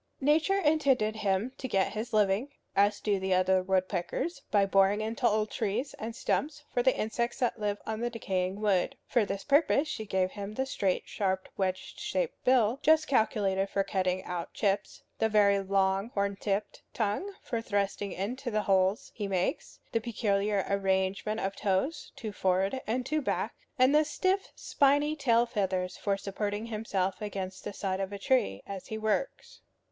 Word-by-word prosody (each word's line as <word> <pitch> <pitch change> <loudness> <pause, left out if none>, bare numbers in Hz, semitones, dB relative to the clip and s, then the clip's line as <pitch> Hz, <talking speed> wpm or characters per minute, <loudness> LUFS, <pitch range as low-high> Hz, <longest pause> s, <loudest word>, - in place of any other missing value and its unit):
Nature 310 +7 +3
intended 280 - +2
him 205 +3 0
to 260 - -3
get 195 -3 +1
his 220 +3 -4
living, 210 +4 +2 0.3
as 205 +1 +3
do 205 -2 0
the 190 0 +1
other 185 0 +3
woodpeckers, 190 - -1
by 205 -2 +4
boring 195 +1 +3
into 225 +3 0
old 215 0 +1
trees 225 +6 -2
and 225 +1 -5
stumps 295 +3 -1
for 245 - +2
the 260 +1 +3
insects 235 +3 -1
that 245 -2 0
live 205 -1 -1
on 220 0 -3
the 240 +1 -1
decaying 190 -4 -2
wood. 210 +5 +1
For 235 -4 +2
this 200 0 -4
purpose 290 +1 +3
she 220 -8 -5
gave 185 -1 +1
him 205 +1 -6
the 265 - 0
straight, 195 -8 0
sharp, 190 -2 -1
wedge 190 -1 -3
shaped - - -2
bill, 250 -1 +3
just 315 0 +5
calculated 200 -6 +1
for 195 - +1
cutting 185 -1 -1
out 175 -2 -4
chips; 200 -1 -1 0.2
the 220 - +2
very 200 -2 +4
long 195 +1 +1
horn 200 0 0
tipped 200 +1 -2
tongue 230 - -1
for 230 -2 -2
thrusting 200 -2 -1
into 245 +8 -3
the 215 -2 0
holes 190 +1 +2
he 205 -3 -3
makes; 185 -2 -2
the 230 - 0
peculiar 205 -3 0
arrangement 195 +2 0
of 195 -1 -2
toes, 205 - -1
two 235 -5 -5
forward 190 +5 0
and 245 +3 -1
two 310 +3 0
back; - - -1 0.2
and 255 +2 +5
the 305 +1 +6
stiff, 375 +6 0
spiny 290 +2 +2
tail 240 -5 +3
feathers 185 -5 -1
for 200 -1 -1
supporting 205 +2 -3
himself 210 -4 -2
against 190 -2 -5
the 210 - -4
side 190 -1 -2
of 195 0 -3
a 200 - -4
tree 195 - +1
as 195 -2 -7
he 220 - -4
works. 220 - -2
210 Hz, 175 wpm, -30 LUFS, 195-240 Hz, 0.3 s, the